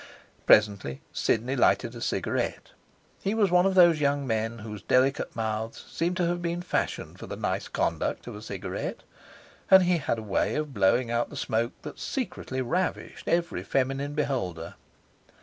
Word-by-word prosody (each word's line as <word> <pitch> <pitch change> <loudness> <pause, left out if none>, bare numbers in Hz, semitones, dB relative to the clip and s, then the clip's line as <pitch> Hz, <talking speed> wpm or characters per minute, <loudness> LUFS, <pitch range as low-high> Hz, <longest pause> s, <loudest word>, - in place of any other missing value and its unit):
Presently, 100 -10 +4
Sidney 120 +5 0
lighted 120 -2 +3
a 120 - -9
cigarette. - - -2 0.5
He 200 +3 0
was 205 -5 +3
of 180 +2 +4
those 170 -4 +6
young 140 -1 +1
men 115 -1 -1
whose 105 -2 -7
delicate 130 +2 +2
mouths 110 0 -3
seem 175 +2 -1
to 180 - +1
have 175 +1 -1
been 170 0 -2
fashioned - - -2
for - - -8
the - - -5
nice - - -2
conduct - - -1
of - - -7
a - - -8
cigarette. - - -5 0.7
And 190 -1 +8
he 180 0 +3
had 115 - -1
a 110 - -5
way 105 - 0
of 150 -2 -2
blowing 115 +4 +2
out 120 0 0
the - - -10
smoke 115 +2 -1
that 150 - -8
secretly 130 - -3
ravished 180 +9 -2
every 170 0 0
feminine 135 +2 -1
beholder. 110 - -2
135 Hz, 165 wpm, -27 LUFS, 115-170 Hz, 0.7 s, And